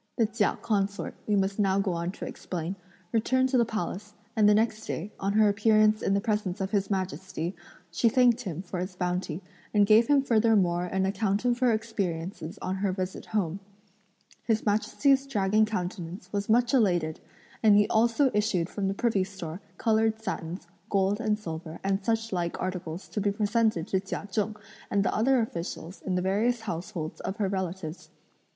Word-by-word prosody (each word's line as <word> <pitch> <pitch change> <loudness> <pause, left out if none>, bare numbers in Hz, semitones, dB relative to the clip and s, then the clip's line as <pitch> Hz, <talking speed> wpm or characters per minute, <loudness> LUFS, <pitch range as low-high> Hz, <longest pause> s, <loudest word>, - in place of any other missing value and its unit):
The 230 - +4
Chia 215 -1 0
consort, 200 -2 -1
we 210 - +2
must 195 +1 0
now 195 -2 +3
go 195 -1 +1
on 170 +1 -2
to - - -7
explain, 175 +1 -5 0.4
returned 260 +3 +2
to 260 - +2
the 235 - +4
Palace, 210 -1 -4 0.2
and 210 -2 +5
the 210 - +6
next 220 0 0
day, 200 +6 -4
on 195 +1 0
her 215 0 +5
appearance 215 +1 +4
in 195 - +1
the - - +3
presence 210 -4 -1
of 190 0 -2
His 200 -2 0
Majesty, 185 -2 -3 0.4
she 200 +7 +3
thanked 245 0 +4
him 180 -6 -5
for 180 -1 -5
his 185 +1 -4
bounty 180 -1 -2 0.3
and 205 -1 +6
gave 220 +3 +6
him 285 -2 +4
furthermore 210 -8 +3
an 190 +1 0
account 200 +2 0
of 240 -1 +2
her 250 -2 +4
experiences 190 -5 -3
on 190 +1 -2
her 195 0 0
visit 185 0 -4
home. 195 -4 -1 0.8
His 220 -2 0
Majesty's 270 +6 +2
dragon 215 -3 +2
countenance 180 -2 -5
was 200 +1 -2
much 240 +2 +3
elated, 175 -10 +2 0.4
and 215 -2 +6
he 210 - +4
also 235 +4 +3
issued 195 -5 +1
from 200 -2 -2
the 195 - -1
privy 215 -4 +1
store 185 -2 -7 0.2
coloured 220 -1 +2
satins, 175 -4 -5 0.2
gold 195 +1 +2
and 215 -2 +1
silver 165 -5 -7
and 195 0 0
such 225 0 0
like 170 -2 -2
articles 180 -1 -4
to 210 - -2
be 205 0 +2
presented 215 -3 +1
to 190 - +2
Chia 195 +1 -5
Cheng 210 +2 -1 0.3
and 200 -1 +1
the - - +1
other 255 +4 +3
officials 170 -3 -5
in 185 - -2
the 180 - 0
various 220 +5 +1
households 170 -4 -5
of 190 - -3
her 205 -3 +1
relatives. 185 -3 -4
200 Hz, 185 wpm, -28 LUFS, 185-220 Hz, 0.8 s, the